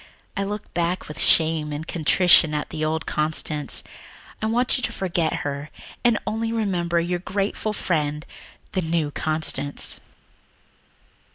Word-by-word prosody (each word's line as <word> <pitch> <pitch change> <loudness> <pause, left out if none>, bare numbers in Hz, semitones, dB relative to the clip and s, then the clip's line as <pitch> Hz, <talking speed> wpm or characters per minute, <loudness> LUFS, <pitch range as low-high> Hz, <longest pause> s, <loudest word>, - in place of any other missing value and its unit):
I 200 - -1
look 205 +1 -6
back 175 +1 -1
with 150 - -6
shame 160 -2 +4
and 150 +2 -5
contrition 165 -1 +4
on 150 - -1
the 155 -1 -4
old 155 +1 -1
Constance. 150 -1 -1 0.6
I 220 - 0
want 245 +3 +2
you 255 - -2
to - - -2
forget 170 -4 -1
her 145 +1 -4 0.3
and 240 -3 +4
only 225 +1 -2
remember 180 -6 0
your 175 +1 -1
grateful 200 +3 -2
friend, 150 -6 -2 0.5
the 185 - -1
new 160 -3 -1
Constance." 155 -2 +3
170 Hz, 135 wpm, -23 LUFS, 155-195 Hz, 0.6 s, shame